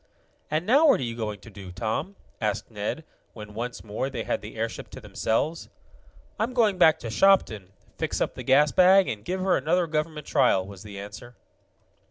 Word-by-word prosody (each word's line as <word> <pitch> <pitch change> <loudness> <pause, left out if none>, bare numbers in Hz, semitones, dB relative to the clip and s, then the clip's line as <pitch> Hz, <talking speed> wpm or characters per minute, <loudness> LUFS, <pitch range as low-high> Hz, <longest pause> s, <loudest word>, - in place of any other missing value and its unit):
"And 155 +3 -1
now 280 - +5
what 280 - +5
are - - -2
you 115 -1 -4
going 105 -3 -4
to 115 - -13
do, 95 -2 -10
Tom?" 110 - -3 0.3
asked 105 +1 -2
Ned, 105 +9 -4 0.3
when, 105 -2 -10
once 120 +3 -5
more, 110 +5 -3
they 120 -4 -4
had - - -2
the 105 - -10
airship 115 0 -4
to - - -10
themselves. 150 +9 -2 0.7
"I'm 235 +3 -1
going 215 -6 +2
back 160 -3 +6
to 115 - -5
Shopton, 110 - +3 0.3
fix - - -2
up - - -1
the - - -8
gas 145 +3 +4
bag, 190 +1 +6
and 105 -2 -4
give 185 - -3
her 185 -1 +2
another 175 +3 +1
government 155 -1 -3
trial," 95 -1 +3
was 100 -1 -11
the 105 -2 -10
answer. 105 +5 -9
120 Hz, 195 wpm, -26 LUFS, 105-180 Hz, 0.7 s, back